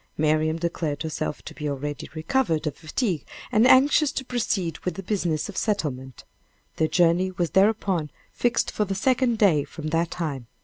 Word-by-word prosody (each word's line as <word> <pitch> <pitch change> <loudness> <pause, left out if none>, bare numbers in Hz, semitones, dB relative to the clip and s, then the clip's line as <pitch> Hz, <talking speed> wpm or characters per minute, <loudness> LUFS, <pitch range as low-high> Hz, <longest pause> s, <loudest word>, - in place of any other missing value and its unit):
Marian 155 +1 +2
declared 165 -3 -2
herself 155 -1 -4
to - - -9
be 150 -2 -4
already 145 +1 -4
recovered 160 -1 0
of 150 - -2
fatigue, 170 - -2 0.3
and 220 +3 +5
anxious 280 +3 +5
to 265 - -3
proceed 200 -9 -1
with 180 -3 -3
the 195 - -6
business 175 -6 -1
of 205 - -9
settlement. 135 - -2 0.5
Their 160 - +2
journey 175 +2 +3
was 175 -2 -2
thereupon 190 -5 +2 0.2
fixed 240 -1 0
for 210 - 0
the 195 -1 -3
second 245 +2 +2
day 175 -9 +4
from 155 +1 -7
that 165 +1 +1
time. 140 -8 -4
170 Hz, 170 wpm, -25 LUFS, 155-210 Hz, 0.5 s, and